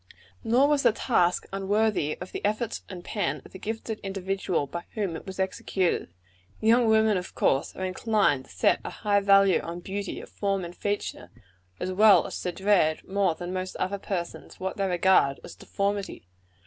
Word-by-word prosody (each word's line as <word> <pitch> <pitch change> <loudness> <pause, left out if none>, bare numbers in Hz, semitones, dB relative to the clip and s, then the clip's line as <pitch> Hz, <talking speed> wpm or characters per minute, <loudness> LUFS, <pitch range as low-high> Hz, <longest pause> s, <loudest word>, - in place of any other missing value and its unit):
Nor 250 +5 +4
was 295 -1 +2
the - - +5
task 180 -7 +1
unworthy 195 -5 +1
the 180 - -7
efforts 215 +2 -1
and 180 -3 -8
pen 205 - -2
of - - -14
the 190 - -10
gifted 220 +1 -4
individual 195 -4 -2
by 170 +5 -7
whom 200 -6 -2
it - - -9
was 190 0 -7
executed. 190 - -1 0.5
Young 230 +2 +4
women, 220 -2 +4
of 180 - -6
course, 135 - +1
are 185 - -3
inclined 185 - +1
to - - -22
set - - +2
a - - -4
high 205 -2 +1
value 195 -1 +5
on 170 +1 -6
beauty 195 +3 -5
of - - -11
form 195 -2 -1
and 170 +1 -9
feature, 205 0 -3 0.5
as 185 - -2
well 205 +2 +6
as - - -5
to 180 - -2
dread, 190 -5 +1
more 195 -3 +1
than 175 +2 -6
most 185 0 -4
other 200 +2 -2
persons, 180 -3 -5
what 190 0 -3
they 195 -1 0
regard 175 -6 +3
as - - -9
deformity. 200 - -3
195 Hz, 180 wpm, -27 LUFS, 180-210 Hz, 0.5 s, well